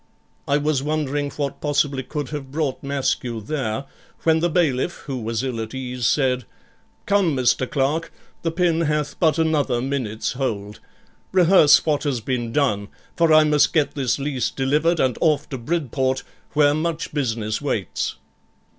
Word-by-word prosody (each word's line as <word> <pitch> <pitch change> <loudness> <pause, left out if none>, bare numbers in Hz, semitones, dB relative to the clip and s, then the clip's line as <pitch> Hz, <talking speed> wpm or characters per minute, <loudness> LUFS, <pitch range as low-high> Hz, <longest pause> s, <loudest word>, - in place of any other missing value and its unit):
I 140 - +3
was 150 -2 0
wondering 145 -1 -1
what 140 -2 -3
possibly 145 -2 +1
could 145 +2 -5
have 145 -3 -6
brought 145 -2 -2
Maskew 135 -4 -1
there, 110 0 -3 0.4
when 160 -1 +4
the 175 +2 +1
bailiff, 160 -2 0
who 135 -3 -3
was 115 +1 -2
ill 125 -4 -2
at 110 +3 -6
ease, 125 -2 -2
said 130 -3 +1 0.6
'Come, 195 -7 +2
Mr. 130 0 +2
Clerk, 145 +4 0 0.3
the 165 - 0
pin 170 -1 +1
hath 150 -2 -1
but 160 -3 +3
another 155 -6 +1
minute's 125 -5 -2
hold; 105 -6 -3 0.5
rehearse 180 -5 +6
what 150 -3 +1
has 140 -5 -1
been 120 0 -2
done, 110 -8 +1 0.3
for 165 -1 +3
I 155 0 +7
must 150 -1 +3
get 155 -4 +2
this 135 -4 0
lease 140 -2 -1
delivered 150 +5 +1
and 130 -2 +1
off 150 -3 +2
to 135 - -5
Bridport, 130 -2 -1 0.3
where 145 -1 +4
much 160 +1 -2
business 115 -7 -1
waits.' - - -2
140 Hz, 155 wpm, -22 LUFS, 130-155 Hz, 0.6 s, I